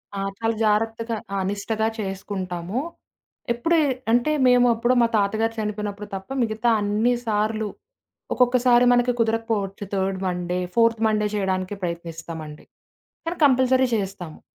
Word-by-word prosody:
ఆ! - - -3 0.2
చాలా 225 0 0
జాగ్రత్తగా 225 +2 0 0.2
ఆ! - - 0
నిష్టగా 220 +2 -1
చేసుకుంటాము. 190 0 -4 0.7
ఎప్పుడే 325 +8 +2 0.3
అంటే, 245 +5 +3
మేమెప్పుడో 245 -1 +4
మా 235 - +4
తాతగారు 220 +3 +1
చనిపోయినప్పుడు 210 -1 -4
తప్ప, 190 0 -8
మిగతా 220 +1 0
అన్ని 210 +4 +2
సార్లు 215 0 0 0.7
ఒక్కొక్కసారి 245 0 +4
మనకి 245 0 +3
కుదరకపోవచ్చు. 220 -3 -1
థర్డ్ 190 0 0
మండే, 180 0 -2 0.2
ఫోర్త్ 230 -1 +3
మండే 210 -1 +1
చేయడానికే 190 0 -1
ప్రయత్నిస్తామండి. 165 -2 -6 0.6
కానీ, 335 +1 -3
కంపల్సరీ 260 -1 +4
చేస్తాము. 190 -5 -5
215 Hz, 115 wpm, -23 LUFS, 195-235 Hz, 0.7 s, మేమెప్పుడో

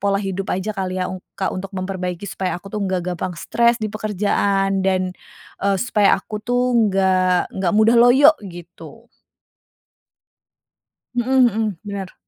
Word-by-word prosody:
pola 200 0 +1
hidup 195 -1 -4
aja 190 +4 -2
kali 185 -2 -3
ya, 180 - 0 0.3
Kak, 190 - -2
untuk 190 +1 -5
memperbaiki 185 0 -4
supaya 190 -2 -3
aku 195 +3 -12
itu 210 - -2
enggak 185 -2 -1
gampang 180 0 -5
stres 235 +6 +2
di 215 -2 -4
pekerjaan, 200 -2 0
dan, 185 -1 0 0.5
eee, 200 0 +1
supaya 210 -1 +3
aku 210 +2 -7
tuh 245 +2 0 0.2
nggak 185 -2 +1
nggak 190 -2 -1
mudah 220 +2 +5
loyo, 265 +6 +7 0.2
gitu. 175 0 -12 2.1
Mhm 255 +2 +3
mhm. 220 -5 0
Bener. 200 -2 -6
195 Hz, 140 wpm, -20 LUFS, 185-215 Hz, 2.1 s, loyo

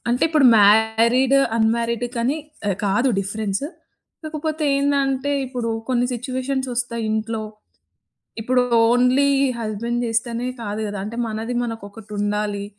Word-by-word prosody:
అంటే 245 +1 0
ఇప్పుడు 305 -5 +4
married, 220 +5 +4 0.2
unmarried 230 +1 +1
కానీ 245 +5 0 0.3
ఆహ్, 195 - 0
కాదు 205 +7 +2
డిఫరెన్స్. 200 +4 -3 0.6
కాకపోతే 310 0 -3
ఏందంటే 280 -1 +1
ఇప్పుడు 245 -3 -3 0.2
కొన్ని 245 -1 +2
సిట్యుయేషన్స్ 260 +2 -3
ఒస్తాయి 235 -1 -2
ఇంట్లో 220 0 -2 1.0
ఇప్పుడు 250 +3 +2 0.3
ఓన్లీ 250 +4 +3 0.3
హస్బెండ్ 235 +2 -2
జేస్తేనే 235 +2 -1 0.2
కాదు 210 0 -4
గదా! 205 -1 -5
అంటే 220 +2 -6
మనది 225 +2 -4
మనకొకటుండాలి. 210 -2 -4
235 Hz, 115 wpm, -21 LUFS, 215-255 Hz, 1.0 s, ఇప్పుడు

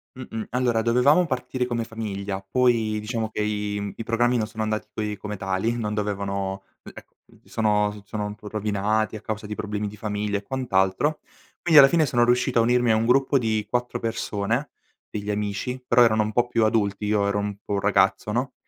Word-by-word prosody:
Mh-mh, 115 -4 -6
allora 120 -2 +1
dovevamo 125 +9 +4
partire 125 -1 -2
come 120 -2 -1
famiglia, 100 -4 -5
poi 115 0 +1
diciamo 110 +1 -3
che 110 - -3
i, 105 -1 -2
mhmm 100 0 -4
i - - -5
programmi 120 +2 +2
non 110 -2 -1
sono 110 0 -4
andati 110 0 -2
coi 105 -1 -3
come 105 +1 -6
tali 95 +5 -1
non 105 -3 -2
dovevano 100 -2 -2 0.2
e - - -10
e - - -11 0.3
mhmm, - - -23
sono 105 -2 +1
s 105 0 -11
sono 105 0 -4
un 105 - -4
po' 105 0 -12
rovinati 105 +1 0
a 105 - -7
causa 105 -1 -5
di 105 - -5
problemi 105 0 -3
di 105 +1 -9
famiglia 105 -1 -2
e - - -5
quant'altro. 120 +3 0 0.4
Quindi 160 -4 +7
alla 135 - +10
fine 165 0 +3
sono 120 -2 +3
riuscito 125 +1 +2
a - - +5
unirmi 120 0 +3
a - - +4
un 110 +1 +1
gruppo 135 +3 +3
di 110 -4 -1
4 120 +1 -1
persone 115 +3 -2 0.4
degli 105 -1 -5
amici, 105 +5 -3
però 120 +1 +5
erano 110 -2 +3
un 105 - -3
po' 120 +2 +2
più 115 -2 +2
adulti 105 -2 0
io 105 -1 +1
ero 100 0 0
un 100 0 -3
po' 100 -1 -1
ragazzo 100 +1 +2
no; 125 +4 -1
110 Hz, 210 wpm, -24 LUFS, 105-120 Hz, 0.4 s, alla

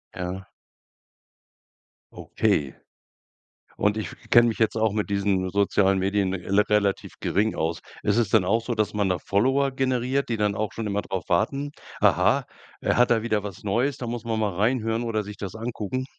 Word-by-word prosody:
Ja. 90 +1 -5 1.6
Okay. 70 -3 -1 1.0
Und 105 +1 +1
ich 105 -6 -3 0.2
kenne 120 0 +7
mich 115 - -2
jetzt 110 0 +2
auch 110 -2 +2
mit 105 -1 -2
diesen 100 -2 0
sozialen 100 0 +2
Medien 95 0 0
rela 95 +2 +1
relativ 100 -2 +1
gering 105 +3 0
aus. 80 +1 -2 0.2
Ist 105 +2 +2
es 115 -5 +2
denn 105 -5 +4
auch 115 +4 +2
so, 120 -1 -2
dass 110 -1 0
man 100 -2 +1
da 90 - +1
Follower 135 - +1
generiert, 130 0 0
die 115 - 0
dann 105 -1 +1
auch 110 0 -2
schon 115 - -5
immer 100 0 -1
drauf 95 -3 -5
warten: 140 +11 0 0.3
Aha, - - +3 0.3
er - - 0
hat 125 0 +4
da 115 -2 +3
wieder 105 -3 0
was 100 -2 -8
Neues, 120 +7 0
da 120 - -5
muss 120 -1 -4
man 110 -1 -2
mal 105 -4 0
reinhören 115 +2 0
oder 110 -2 -1
sich 105 +1 -8
das 100 0 -6
angucken? 115 +2 -4
105 Hz, 180 wpm, -25 LUFS, 100-115 Hz, 1.6 s, kenne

